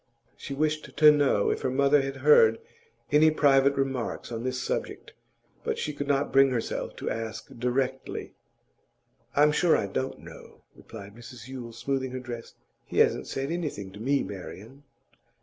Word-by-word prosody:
She 140 - -7
wished 155 +1 -2
to 150 -1 +8
know 145 -8 +2
if - - -3
her - - 0
mother 140 +2 +3
had 135 0 -4
heard 115 -7 +6 0.5
any 150 +2 +6
private 140 -2 +4
remarks 135 -3 -3
on 115 0 -4
this 130 0 -2
subject, - - -4 0.5
but - - -2
she 150 - -3
could 145 0 -5
not 140 0 +1
bring 135 0 +6
herself 120 -3 -3
to - - -4
ask 115 0 -5
directly. 130 +2 -2 1.0
'I'm 150 +1 +5
sure 165 +2 +3
I - - -1
don't 130 +7 -3
know,' - - -14
replied 100 -2 -11
Mrs 120 0 -11
Yule, 125 -3 -7
smoothing 130 +2 -2
her 130 - -3
dress. 120 -2 -8 0.3
'He - - -6
hasn't - - +3
said 135 +3 -3
anything 150 - -4
to 100 - -12
me, 135 +5 +1
Marian. 105 +7 -9
135 Hz, 165 wpm, -27 LUFS, 115-145 Hz, 1.0 s, to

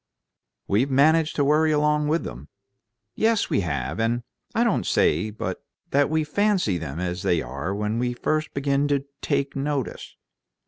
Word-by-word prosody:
"We've 115 +8 +2
managed 155 +4 +3
to 145 - +2
worry 155 +2 +3
along 150 0 +2
with 160 +3 +1
them." 65 +4 -8 0.7
"Yes, 225 -1 +1
we - - +3
have. 75 - -2
And 120 +2 0 0.3
I - - +3
don't - - +1
say 85 +8 +2
but 105 - -5 0.3
what 140 +1 +3
we 160 0 +1
fancy 180 - +1
them 80 -1 -5
as 90 0 -3
they 90 -4 +2
are 75 +9 -4
when 105 +2 -1
we 125 0 0
first 155 +5 -1
begin 140 +1 +1
to 140 -1 0 0.2
'take 140 -1 -1
notice.' 140 -2 -3
140 Hz, 165 wpm, -24 LUFS, 100-150 Hz, 0.7 s, managed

